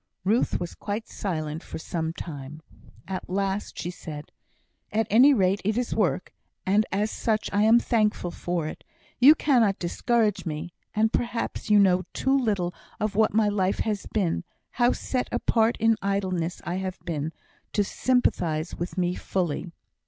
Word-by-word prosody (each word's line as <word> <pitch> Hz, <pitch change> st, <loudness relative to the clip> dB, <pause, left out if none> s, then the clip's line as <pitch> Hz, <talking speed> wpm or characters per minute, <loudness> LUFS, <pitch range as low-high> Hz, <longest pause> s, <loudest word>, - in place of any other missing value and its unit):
Ruth 215 Hz, +6 st, +2 dB
was 175 Hz, -1 st, -4 dB
quite 210 Hz, +2 st, -4 dB
silent 155 Hz, -5 st, -3 dB
for -, -, -7 dB
some 160 Hz, 0 st, -3 dB
time. 155 Hz, -2 st, -8 dB, 0.4 s
At 185 Hz, -1 st, -5 dB
last 195 Hz, +2 st, -2 dB
she 175 Hz, +2 st, -3 dB
said: 155 Hz, -4 st, -8 dB, 0.6 s
"At 220 Hz, +1 st, +1 dB
any 250 Hz, +7 st, +7 dB
rate 195 Hz, -5 st, +2 dB
it 215 Hz, +3 st, 0 dB
is 245 Hz, -1 st, -1 dB
work, 185 Hz, -3 st, 0 dB, 0.3 s
and 205 Hz, +3 st, +3 dB
as 205 Hz, +3 st, 0 dB
such 220 Hz, -2 st, -1 dB
I 205 Hz, -, +3 dB
am 225 Hz, +2 st, +7 dB
thankful 215 Hz, -7 st, +1 dB
for 175 Hz, -2 st, -2 dB
it. -, -, -8 dB, 0.4 s
You 280 Hz, +5 st, +9 dB
cannot 235 Hz, -10 st, +3 dB
discourage 215 Hz, +4 st, +1 dB
me 160 Hz, +1 st, -5 dB, 0.2 s
and 220 Hz, +1 st, +2 dB
perhaps 235 Hz, -2 st, -2 dB
you 210 Hz, -, +6 dB
know 185 Hz, -2 st, +5 dB
too 265 Hz, +1 st, +1 dB
little 205 Hz, -9 st, 0 dB, 0.3 s
of 215 Hz, -1 st, -1 dB
what 215 Hz, 0 st, +2 dB
my 220 Hz, -1 st, +4 dB
life 195 Hz, -2 st, +1 dB
has 210 Hz, -3 st, -2 dB
been 185 Hz, -5 st, 0 dB, 0.3 s
how 240 Hz, 0 st, +3 dB
set 255 Hz, -1 st, -2 dB
apart 225 Hz, 0 st, +2 dB
in 225 Hz, 0 st, +4 dB
idleness 185 Hz, -3 st, -1 dB
I 175 Hz, +1 st, -2 dB
have 190 Hz, 0 st, -3 dB
been 160 Hz, -3 st, -3 dB, 0.4 s
to 205 Hz, -, +3 dB
sympathise 175 Hz, -10 st, 0 dB
with 175 Hz, +3 st, -5 dB
me 180 Hz, -1 st, +1 dB
fully." 180 Hz, -2 st, -2 dB
195 Hz, 160 wpm, -26 LUFS, 175-220 Hz, 0.6 s, You